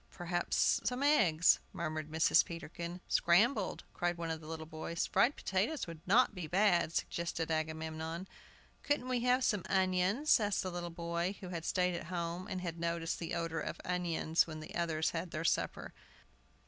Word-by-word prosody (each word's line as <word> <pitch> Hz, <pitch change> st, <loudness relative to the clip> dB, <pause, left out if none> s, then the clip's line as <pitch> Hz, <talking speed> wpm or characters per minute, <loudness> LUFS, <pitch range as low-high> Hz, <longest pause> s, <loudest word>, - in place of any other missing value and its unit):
"Perhaps 175 Hz, 0 st, +1 dB
some 250 Hz, +3 st, -1 dB
eggs," 180 Hz, -, +5 dB
murmured 155 Hz, -2 st, -3 dB
Mrs. 160 Hz, +1 st, +4 dB
Peterkin. 170 Hz, +1 st, -7 dB
"Scrambled," 200 Hz, +4 st, +3 dB
cried 175 Hz, 0 st, -1 dB
one 165 Hz, -1 st, -3 dB
of 160 Hz, 0 st, -4 dB
the 155 Hz, -, -11 dB
little 160 Hz, 0 st, -5 dB
boys. 160 Hz, +2 st, -3 dB
"Fried 235 Hz, +9 st, +3 dB
potatoes 210 Hz, +11 st, -1 dB
would 165 Hz, -2 st, -9 dB
not 230 Hz, +4 st, +5 dB
be 180 Hz, -5 st, -5 dB
bad," 180 Hz, -1 st, +3 dB
suggested 170 Hz, -1 st, -2 dB
Agamemnon. 160 Hz, +2 st, -3 dB, 0.5 s
"Couldn't 290 Hz, -3 st, 0 dB
we 250 Hz, -1 st, +1 dB
have 250 Hz, +2 st, +2 dB
some 210 Hz, -6 st, +2 dB
onions?" 190 Hz, +9 st, +3 dB
asked 205 Hz, -2 st, 0 dB
the 185 Hz, -, -3 dB
little 175 Hz, 0 st, -4 dB
boy 170 Hz, +2 st, -2 dB
who 185 Hz, -, -7 dB
had 170 Hz, -2 st, -5 dB
stayed 180 Hz, -1 st, +1 dB
at 170 Hz, -, -5 dB
home, 175 Hz, +1 st, -3 dB
and 185 Hz, -, -4 dB
had 170 Hz, -2 st, -5 dB
noticed 170 Hz, 0 st, -2 dB
the 170 Hz, 0 st, -3 dB
odor 165 Hz, -1 st, -2 dB
of -, -, -5 dB
onions 170 Hz, -2 st, +1 dB
when 155 Hz, -1 st, -6 dB
the 155 Hz, -, -9 dB
others 160 Hz, -2 st, 0 dB
had 170 Hz, +1 st, -3 dB
their 160 Hz, +1 st, -4 dB
supper. -, -, -1 dB
170 Hz, 175 wpm, -34 LUFS, 165-185 Hz, 0.5 s, eggs